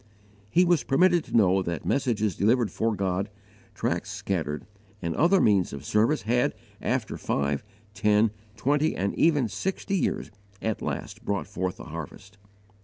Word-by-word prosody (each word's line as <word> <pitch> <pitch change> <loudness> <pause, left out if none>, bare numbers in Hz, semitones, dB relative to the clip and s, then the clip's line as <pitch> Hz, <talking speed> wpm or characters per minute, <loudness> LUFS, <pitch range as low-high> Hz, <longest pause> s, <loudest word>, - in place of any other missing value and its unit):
He 175 +12 +4
was 175 -3 +3
permitted 175 +3 +4
to - - 0
know 95 -3 +4
that 85 -3 -4
messages 110 - +1
delivered 115 0 +2
for 110 -1 0
God, 95 +1 -1 0.5
tracts - - -1
scattered, 80 -6 -3 0.3
and 85 -4 -3
other 180 +5 +4
means 100 - +3
of 70 0 -7
service 110 - +2
had, 120 +3 +1 0.3
after - - -1
five, 70 0 -1 0.3
ten, 105 +2 +3 0.3
twenty, 145 +6 +1
and 100 +2 -1
even 150 -7 +3
sixty 190 - -2
years, 180 - -1 0.3
at 110 0 -2
last - - -4
brought 100 -1 -1
forth 95 -2 -3
a - - -7
harvest. 95 +5 -9
105 Hz, 150 wpm, -27 LUFS, 95-135 Hz, 0.5 s, He